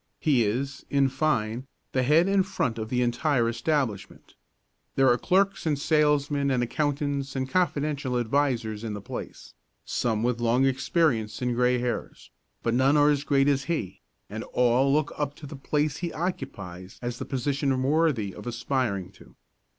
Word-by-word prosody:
He 140 -7 +3
is, 135 +6 -2
in 140 -1 +3
fine, 130 -4 -1 0.2
the 130 - +1
head 155 +7 +4
and 195 -1 +3
front 125 -11 -2
of 110 0 -4
the 125 0 +1
entire 120 +1 +1
establishment. 115 -3 -2 0.6
There 135 0 +4
are 120 - +5
clerks 195 -1 +1
and 150 -2 +1
salesmen 145 -1 +2
and 125 -2 +1
accountants 140 +1 -1
and 130 0 -1
confidential 145 -6 0
advisers 120 -3 0
in 110 -2 -4
the - - -5
place, - - -8 0.3
some 110 -2 -1
with 120 -1 0
long 120 +3 +3
experience 130 -5 +1
and 125 -1 +1
grey 125 +1 +2
hairs, 120 0 -4 0.3
but 115 - +1
none 135 +4 +4
are 145 0 +5
as 145 -1 0
great 140 -2 +2
as 140 -1 +1
he, 125 - -3 0.3
and 110 +3 -6
all 125 +2 +3
look 150 +1 +1
up 145 -1 -2
to 150 - -11
the 145 - -8
place 150 +1 -1
he 175 -2 -3
occupies 95 - -5
as 120 0 -4
a - - -3
position 135 0 -1
worthy 140 - +1
of - - -10
aspiring 120 -6 -2
to. - - -18
135 Hz, 165 wpm, -26 LUFS, 120-145 Hz, 0.6 s, are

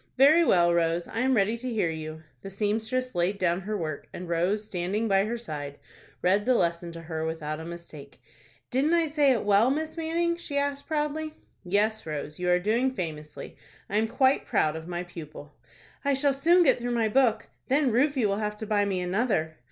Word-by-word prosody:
"Very 300 +6 +6
well, 175 - +4
Rose, 170 0 +1
I 225 - -4
am 260 +1 +2
ready 210 +1 +2
to 255 +2 -5
hear 205 -7 0
you." 160 0 -7 0.2
The 195 - -7
seamstress 220 +6 -1
laid 175 +3 0
down 180 -1 +1
her 210 +2 -3
work, 155 -5 -5
and 180 - -7
Rose 180 +6 0
standing 200 +3 -2
by 195 -1 +3
her 235 +2 -2
side, 145 -10 -6 0.5
read 195 +3 +3
the 255 - +4
lesson 170 -3 0
to 165 - -8
her 160 -1 -4
without 160 -1 -3
a 160 - -7
mistake. 170 -4 -10 0.5
"Didn't 280 +6 +2
I 335 -1 +3
say 295 -2 +3
it 235 -5 0
well, 205 +4 +4
Miss 315 +3 -2
Manning?" 335 +1 0
she 295 -4 -4
asked, 280 0 -1
proudly. 310 0 -2 0.3
"Yes, 205 +2 0
Rose, 150 0 -5
you 180 0 0
are 180 - +5
doing 225 +8 +1
famously; 155 -10 -6 0.4
I 205 - +1
am 220 +1 +2
quite 265 +4 +2
proud 155 0 +1
of 160 +1 -7
my 175 0 -3
pupil." 155 -4 -10 0.5
"I 280 -1 +2
shall 280 +1 +2
soon 340 +6 +4
get 285 - +3
through 240 +1 -3
my 225 -2 +2
book. 225 -1 +2 0.2
Then 270 -1 +2
Rufie 260 +1 +2
will 200 -1 +1
have 210 0 -3
to 220 - -6
buy 205 -1 +1
me 190 -2 -1
another." 180 -4 0
210 Hz, 205 wpm, -27 LUFS, 170-260 Hz, 0.5 s, Very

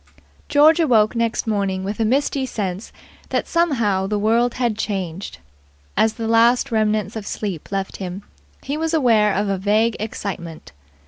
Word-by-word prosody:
George 310 +3 +5
awoke 235 -9 +3
next 230 -1 0
morning 200 -4 -1
with 205 +3 -4
a 225 - +2
misty 270 +3 +1
sense 195 -3 -4 0.4
that - - -1
somehow 230 - +1
the 210 +1 -1
world 230 +3 +2
had 240 -4 0
changed. 195 -4 -4 0.6
As 220 0 +3
the 225 -1 -4
last 235 +3 +3
remnants 215 -1 0
of 215 -2 -6
sleep 195 -7 -5
left 195 -1 -3
him, 190 +1 -6 0.4
he 285 +2 -3
was 325 +1 -1
aware 225 -8 +4
of 205 +2 0
a 195 -1 -1
vague 215 +4 +2
excitement. 170 - -6
215 Hz, 155 wpm, -21 LUFS, 195-240 Hz, 0.6 s, George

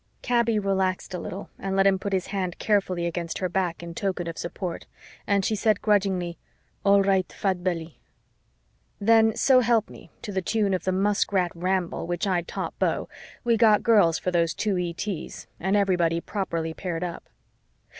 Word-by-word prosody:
Kaby 235 -2 +2
relaxed 190 -2 -1
a 180 - -3
little 195 - -7
and 195 0 -3
let 195 0 +4
him 195 -1 +4
put 200 - -4
his 190 -2 0
hand 185 -2 -2
carefully 190 -5 +1
against 170 -1 -3
her 185 - -1
back 175 -1 -2
in 170 0 -7
token 185 -1 -2
of 165 -1 -5
support 175 +1 -5 0.4
and 200 -2 +2
she 220 - +1
said 215 0 +2
grudgingly, 190 -5 +1 0.4
"All 200 0 +5
right, 190 -1 +1
Fat 190 -3 -1
Belly." 165 -3 -3 1.0
Then, 225 +1 +4
so 260 +1 +5
help 230 -3 +2
me, - - -13
to 215 - -5
the 190 -1 -1
tune 205 +1 0
of 185 - -2
the 185 - +2
Muskrat 195 -2 +1
Ramble, 180 -1 -1
which 175 +2 -1
I'd 180 -3 0
taught - - -5
Beau, - - 0 0.3
we 235 -2 +3
got 215 -2 +5
girls 205 -8 +4
for 180 - -2
those 170 -1 +1
two 210 -3 0
ETs 175 0 -4
and 190 +3 0
everybody 175 -5 +2
properly 170 -4 -3
paired 175 0 -4
up. 175 -2 -6
190 Hz, 175 wpm, -25 LUFS, 175-205 Hz, 1.0 s, All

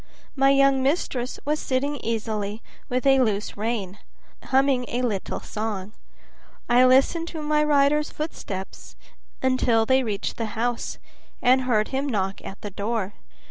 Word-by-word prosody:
My 270 -1 +4
young 275 -1 +4
mistress 265 -3 -1
was 300 +1 0
sitting 280 +3 -1
easily 220 -2 -3 0.3
with 250 +2 -1
a 270 -1 +5
loose 210 -5 0
rein, 210 -3 -3 0.5
humming 265 -1 +2
a 245 +1 -2
little 210 -6 -2
song. 210 -2 -4 0.7
I 245 +1 +5
listened 275 +6 +4
to 320 -2 -6
my 300 0 +2
rider's 295 0 +3
footsteps 200 - -6 0.5
until 250 -3 +3
they 260 +2 +4
reached 210 -5 -3
the 220 -2 -4
house, 240 +1 -2 0.4
and 255 +1 +4
heard 215 -4 +2
him 275 +2 -1
knock 195 -4 -2
at 195 - -8
the 205 - -6
door. 205 0 -2
245 Hz, 140 wpm, -24 LUFS, 215-275 Hz, 0.7 s, a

